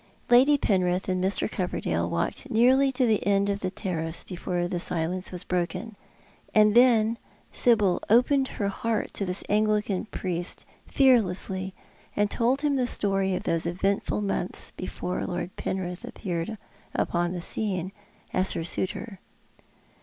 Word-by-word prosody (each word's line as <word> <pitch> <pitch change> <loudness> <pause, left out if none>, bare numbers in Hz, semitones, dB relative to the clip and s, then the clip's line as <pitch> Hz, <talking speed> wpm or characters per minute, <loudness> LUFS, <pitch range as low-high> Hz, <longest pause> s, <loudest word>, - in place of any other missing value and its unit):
Lady 265 +4 +6
Penrith 185 -6 +1
and 185 -1 0
Mr. 190 +2 +1
Coverdale 185 -4 -2
walked - - -2
nearly 260 +4 +4
to 255 -1 +1
the 220 -3 +2
end 200 0 +2
of 200 - -2
the 185 - -2
terrace 165 -4 -3
before 175 -1 -3
the 175 0 -2
silence 180 +2 -1
was 180 -2 -3
broken. 185 +5 -3 0.6
And 210 -1 +6
then 230 -2 +4 0.3
Sibyl 210 -7 +3
opened 265 +4 +4
her 200 -5 -2
heart 225 +2 -2
to 200 - -2
this 180 +1 -1
Anglican 210 -2 +1
priest, 175 -4 -4 0.2
fearlessly, 190 -7 +2 0.4
and 205 0 +1
told 255 +4 +1
him 290 -2 +1
the 250 -1 +1
story 195 -4 +1
of - - -4
those 165 0 0
eventful 195 +4 0
months 195 -2 -2
before 180 0 -4
Lord 180 0 -4
Penritli 190 +5 -4
appeared 180 +1 -4 0.4
upon 175 0 0
the 180 - -4
scene 185 -1 -2 0.4
as 185 +1 +2
her - - -3
suitor. 190 +4 -3
195 Hz, 145 wpm, -26 LUFS, 180-225 Hz, 0.6 s, Lady